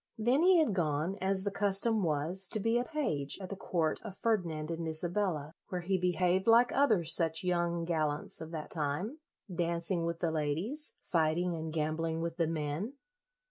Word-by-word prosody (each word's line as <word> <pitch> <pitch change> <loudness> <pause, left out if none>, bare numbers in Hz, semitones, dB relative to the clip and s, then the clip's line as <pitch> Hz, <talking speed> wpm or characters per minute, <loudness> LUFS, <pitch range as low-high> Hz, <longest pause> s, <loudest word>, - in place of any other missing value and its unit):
Then 245 +6 +2
he 365 +1 +6
had 310 -10 +3
gone, 160 0 0
as 190 0 +2
the 200 - -1
custom 205 +2 +2
was, 165 +4 +2
to 215 - -1
be 230 +3 +2
a - - 0
page 200 - -2
at 190 -2 -7
the 200 - -4
court 170 -4 -1
of 195 - -8
Ferdinand 170 -8 -1
and 165 0 -3
Isabella, 160 -1 -1 0.2
where 180 -1 -3
he 190 +2 0
behaved 180 +2 +1
like 235 +2 +6
other 225 -11 +3
such 165 0 +1
young 170 -1 0
gallants 155 -3 -1
of 160 - -6
that 160 -2 -6
time, 165 - -1 0.3
dancing 170 0 0
with 170 0 -2
the 170 -1 0
ladies, 165 - -2
fighting 170 +1 +1
and 160 -1 -4
gambling 160 +1 -1
with 165 0 -3
the 165 -3 +1
men. 160 - -3
170 Hz, 180 wpm, -32 LUFS, 160-195 Hz, 0.3 s, he